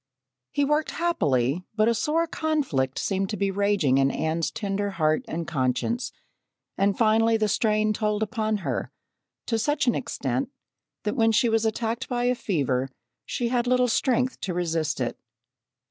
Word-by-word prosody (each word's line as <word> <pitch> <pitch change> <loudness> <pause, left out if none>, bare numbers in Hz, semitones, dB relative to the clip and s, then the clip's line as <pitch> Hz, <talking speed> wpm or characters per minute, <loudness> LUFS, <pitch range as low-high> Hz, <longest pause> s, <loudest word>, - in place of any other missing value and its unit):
He 285 - +1
worked 300 +2 +1
happily 150 - 0
but 215 0 +3
a 235 - +4
sore 300 +9 +1
conflict 280 - -1
seemed 195 -1 -1
to 215 - -3
be 195 +1 0
raging 195 -9 +2
in 135 0 +4
Anne's 160 +3 -1
tender 200 -1 -2
heart 155 -5 +1
and 165 +1 -3
conscience, 145 - -1 0.6
and 200 0 +1
finally 225 0 +4
the 215 -1 +1
strain 215 0 +2
told 210 0 0
upon 220 -1 -1
her - - -2 0.5
to 225 -2 0
such 290 +2 +1
an 240 - +3
extent 135 - -2 0.5
that 210 - -1
when 225 0 +3
she 235 +2 +3
was 225 0 +2
attacked 230 +3 -2
by 245 -1 -1
a 250 +1 +3
fever, 135 - -1 0.4
she 240 -1 -1
had 245 0 0
little 250 0 +3
strength 255 +1 +1
to 180 -3 -3
resist 165 -4 -1
it. 125 - -2
215 Hz, 160 wpm, -25 LUFS, 165-240 Hz, 0.6 s, a